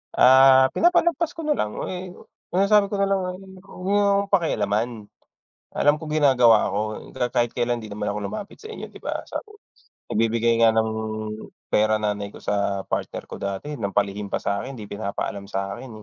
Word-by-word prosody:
Ah, 130 0 +7
pinapalagpas 345 -1 +2
ko 325 - -6
na 300 - 0
lang. 105 0 -1 0.2
Eh, 180 0 -6
oo, - - -18 0.2
sinasabi 200 +2 +3
ko 205 - -4
na 200 0 +1
lang 195 - +2
ay, 180 - -4 0.2
"'Wag 185 -1 -12
niyo 200 +2 +2 0.2
akong 200 - -10
pakialaman. 115 - +1 0.9
Alam 145 - +5
ko 155 - -6
ginagawa 130 -7 +4
ko. - - 0 0.4
Ka 125 -2 -1
kahit 120 -1 +1
kailan 120 0 0
hindi 110 -2 -9
naman 105 - -2
ako 105 - -3
lumapit 205 - -7
sa 435 - -11
inyo, 445 - -8
'di - - -13
ba?" - - -4
Sa - - -3
u 425 - -16 0.5
nagbibigay 115 +1 +1
nga 115 - +7
ng 110 0 +2 0.8
pera 110 0 +3
nanay 105 -1 -2
ko - - -14
sa 100 -1 -1
partner - - -4
ko - - -9
dati 100 +9 -4
ng 110 -9 -3
palihim 100 0 0
pa - - -2
sa'kin, 115 +7 -3
hindi 105 - -8
pinapaalam 100 -1 -5
sa'kin, 100 +6 -4
120 Hz, 185 wpm, -24 LUFS, -, 0.9 s, Ah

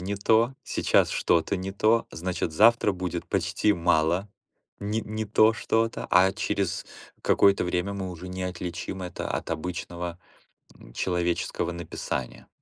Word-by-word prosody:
не 95 +3 -3
то, 115 +5 +3
сейчас - - +2
что-то 85 +3 +1
не 95 +1 -4
то, 110 +3 +2
значит, 85 -1 -3
завтра 110 +4 +5
будет 90 -1 -4
почти 105 - +1
мало 85 +2 +1 0.5
не 105 +2 -1
не 110 0 -4
то 110 +1 +4
что-то, 115 0 -1
а 95 +2 +5
через 100 -1 -2 0.4
какое-то 100 -2 +4
время 90 +2 -1
мы 95 -2 -4
уже 90 +1 -8
не 90 0 -5
отличим 90 +1 -5
это 90 -1 -5
от - - -3
обычного, 85 +1 -4 0.6
м, - - -16
человеческого 85 -1 -1
написания. 80 -6 -5
90 Hz, 140 wpm, -26 LUFS, 85-100 Hz, 0.6 s, завтра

